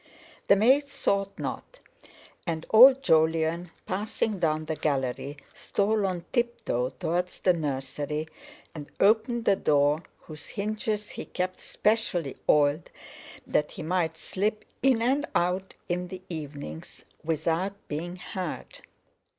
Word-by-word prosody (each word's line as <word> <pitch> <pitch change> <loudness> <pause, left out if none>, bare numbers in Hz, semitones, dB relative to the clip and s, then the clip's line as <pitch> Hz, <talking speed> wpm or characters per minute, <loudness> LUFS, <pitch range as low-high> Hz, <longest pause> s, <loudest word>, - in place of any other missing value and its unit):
The 200 - +7
maid 260 +8 +4
thought 200 -7 -1
not. - - -5 0.7
And 160 -1 -2
old 260 +4 +9
Jolyon, 160 -1 +2 0.2
passing 210 +1 -2
down 155 -2 +1
the 160 0 -2
gallery, 140 -1 -2 0.2
stole 210 0 0
on 180 -2 -3
tiptoe 235 - 0
towards 180 +2 -1
the 180 - +4
nursery, 150 0 -3 0.5
and 150 -3 -8
opened 225 +3 +3
the 195 - +5
door 145 -2 +3 0.2
whose 155 -2 -10
hinges 210 0 -3
he - - -7
kept 185 0 -3
specially 195 - 0
oiled 145 +2 +3 0.6
that 150 - +1
he - - -8
might 165 -1 0
slip 210 +6 -2 0.2
in 255 -3 +3
and 275 +5 +1
out 180 +2 0
in 180 0 -2
the 185 +1 -9
evenings 145 - -7 0.2
without 165 +4 0
being 170 +4 -4
heard. 185 -2 -6
180 Hz, 125 wpm, -27 LUFS, 155-210 Hz, 0.7 s, old